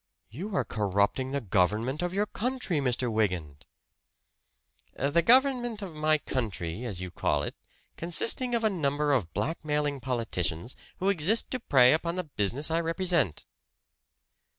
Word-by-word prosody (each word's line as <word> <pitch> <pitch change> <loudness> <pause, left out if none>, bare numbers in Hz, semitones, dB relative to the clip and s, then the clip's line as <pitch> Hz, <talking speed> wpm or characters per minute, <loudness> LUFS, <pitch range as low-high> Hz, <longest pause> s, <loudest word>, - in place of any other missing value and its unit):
"You 190 - -6
are - - +1
corrupting 105 +5 0
the 140 +1 -1
government 110 - 0
of 175 0 -1
your 200 +3 0
country, 235 - -2
Mr. 125 -2 0
Wygant!" 90 -10 -2 1.3
"The 145 +5 +2
government 240 - +3
of 185 -4 -7
my 155 0 +2
country, 105 - -4
as 100 -7 -3
you 90 -1 -6
call - - 0
it, - - -4 0.4
consisting 230 +9 +1
of 230 - -1
a 220 - +4
number 145 -4 0
of 100 -11 0
blackmailing 150 +3 -1
politicians, 115 - -3 0.2
who 190 - 0
exist 200 +4 +2
to 255 - -2
prey 130 - +5
upon 170 +2 -1
the 185 - -2
business 140 - 0
I 165 +1 +2
represent." 165 - 0
145 Hz, 145 wpm, -28 LUFS, 110-180 Hz, 1.3 s, prey